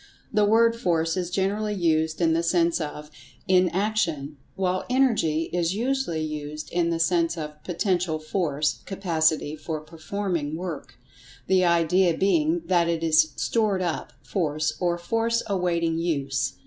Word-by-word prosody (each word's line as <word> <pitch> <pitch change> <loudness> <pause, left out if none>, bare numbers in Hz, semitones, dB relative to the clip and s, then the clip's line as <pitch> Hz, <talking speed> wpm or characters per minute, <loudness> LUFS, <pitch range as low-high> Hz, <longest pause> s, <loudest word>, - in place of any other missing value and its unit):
The 210 -1 +4
word 230 +2 +4
"Force" 165 -6 0
is 180 -2 -2
generally 205 +3 -1
used 160 -2 +1
in 165 -1 +3
the 165 - +2
sense 170 0 +2
of 150 0 -6 0.4
"in 185 -1 +4
action," 170 -7 -1 0.2
while 185 -1 0
"Energy" 225 - +2
is 175 +1 0
usually 240 -9 -1
used 150 0 -6
in 170 -1 +1
the 165 - 0
sense 170 0 +1
of 150 -1 -7
"Potential 180 -2 0
Force—capacity 160 0 -1
for 155 0 -4
performing 160 0 -4
work," 170 -3 -6 0.5
the 185 0 +3
idea 170 0 +3
being 315 - +2
that 175 -2 +2
it 165 -1 -1
is 155 -1 +4
"stored 210 -5 0
up" 170 -3 -3
force, 155 -4 -1
or 175 -1 0
"force 230 +6 0
awaiting 170 -4 0
use." 140 -5 -1
170 Hz, 140 wpm, -25 LUFS, 160-190 Hz, 0.5 s, The